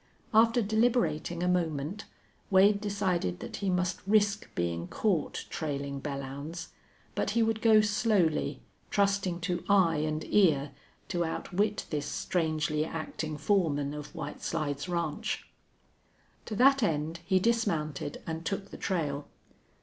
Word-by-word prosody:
After 230 +2 +5
deliberating 220 -6 +1
a - - +1
moment, 170 +1 -1 0.4
Wade 200 +1 +5
decided 190 - -1
that - - -6
he 200 - -1
must 180 0 0
risk 205 0 +2
being 85 0 -1
caught 185 - -1
trailing 140 -3 -3
Belllounds. 140 +4 -5 0.4
But - - -1
he 230 - +5
would 225 -1 0
go 220 -2 +6
slowly, 200 - +1 0.3
trusting 195 -3 +1
to 175 0 -2
eye 185 -5 +5
and 155 +1 -1
ear, 155 -8 +4 0.4
to 175 -2 0
outwit 195 +5 -1
this 150 -2 -2
strangely 155 -3 0
acting 155 -1 -4
foreman 150 -4 +1
of 150 +2 -8
White 150 -3 -6
Slides 155 0 -2
Ranch. 170 -4 -2 1.0
To 215 - -3
that 270 +4 +5
end 160 -4 0
he 190 +2 +2
dismounted 170 -11 -1
and 160 0 -4
took 195 +3 -3
the - - -8
trail. 150 -6 -2
170 Hz, 130 wpm, -30 LUFS, 150-200 Hz, 1.0 s, go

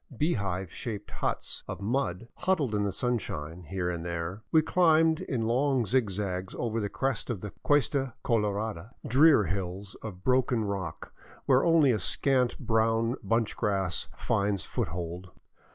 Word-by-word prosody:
Beehive 100 - -1
shaped 105 -4 -5
huts - - -2
of 95 - -5
mud 115 -1 -1
huddled 155 - 0
in 105 -1 +1
the 100 - 0
sunshine 90 - -3
here 95 0 -2
and 85 -1 -4
there. 85 +4 -4
We 160 -1 +5
climbed 160 -2 +4
in 130 -10 -2
long 130 +1 +2
zigzags 100 -5 -1
over 115 -1 -1
the 100 - -2
crest 135 +5 -2
of 110 -7 -3
the 105 - -6
Cuesta 135 -2 +2
Colorada, 105 -2 -1
drear 145 -1 +6
hills 95 +2 -4
of 95 -4 -8
broken 125 -3 +2
rock 95 -5 -5 0.3
where 130 -1 +4
only 165 -5 +5
a 110 - +1
scant 125 +6 +1
brown 115 +1 +1
bunch 115 +2 0
grass 95 -4 0
finds 100 -3 0
foothold. 85 +2 -4
110 Hz, 145 wpm, -29 LUFS, 95-130 Hz, 0.3 s, drear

